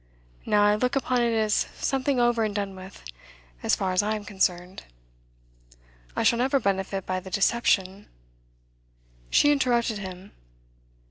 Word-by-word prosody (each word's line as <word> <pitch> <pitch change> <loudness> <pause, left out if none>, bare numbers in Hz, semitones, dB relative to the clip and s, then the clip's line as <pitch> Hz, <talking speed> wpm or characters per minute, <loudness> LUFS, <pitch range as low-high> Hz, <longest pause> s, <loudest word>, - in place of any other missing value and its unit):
Now, 210 0 +3
I 205 0 +4
look 250 +5 0
upon 255 -2 +1
it 235 0 +1
as 215 -1 +1 0.2
something 270 -1 -1
over 240 -1 +2
and 210 -2 -2
done 200 -2 -3
with, 185 +1 -12 0.6
as - - +2
far 190 -1 -2
as 185 - +3
I 215 +1 -1
am 210 -1 -7
concerned. 185 -2 -2 1.3
I - - 0
shall 235 - +3
never 270 +2 +2
benefit 195 -2 -2
by 185 0 -2
the 190 - -10
deception 195 -1 +1 0.7
' - - -40 0.5
She 290 - +4
interrupted 240 -6 +1
him. 190 0 -9
210 Hz, 150 wpm, -25 LUFS, 190-240 Hz, 1.3 s, I